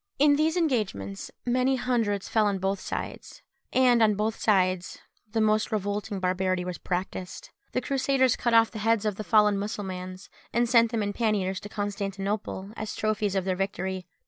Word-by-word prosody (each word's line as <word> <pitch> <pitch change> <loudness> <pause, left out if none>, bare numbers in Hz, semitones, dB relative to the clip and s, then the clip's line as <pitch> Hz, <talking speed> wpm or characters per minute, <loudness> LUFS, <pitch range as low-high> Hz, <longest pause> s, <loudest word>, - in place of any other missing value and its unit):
In 290 +1 +5
these 315 +3 +1
engagements, 210 - -1 0.2
many 255 +2 +2
hundreds 230 -6 0
fell 215 -2 +2
on 200 -1 0
both 195 +1 -1
sides; - - -6 0.3
and 250 -2 +4
on 215 -2 +4
both 215 +2 -1
sides 185 -3 +1 0.3
the 225 +1 -1
most 215 +1 +2
revolting 205 0 -2
barbarity 185 0 0
was 180 -1 -5
practised: 185 - -4 0.2
the - - 0
Crusaders 270 -2 +2
cut 235 -2 +1
off 225 0 +5
the 220 - -6
heads 225 0 +2
of 210 -2 -1
the 215 - -4
fallen 210 -1 +4
Mussulmans, 185 -2 -5 0.2
and 240 0 +2
sent 230 -1 +5
them 225 -3 0
in 205 0 -2
panniers 200 -4 0
to 205 - -9
Constantinople, 200 -1 -3
as 215 -1 -5
trophies 215 -2 0
of 190 -1 0
their 185 -1 0
victory. 190 -1 -3
210 Hz, 170 wpm, -27 LUFS, 190-230 Hz, 0.3 s, In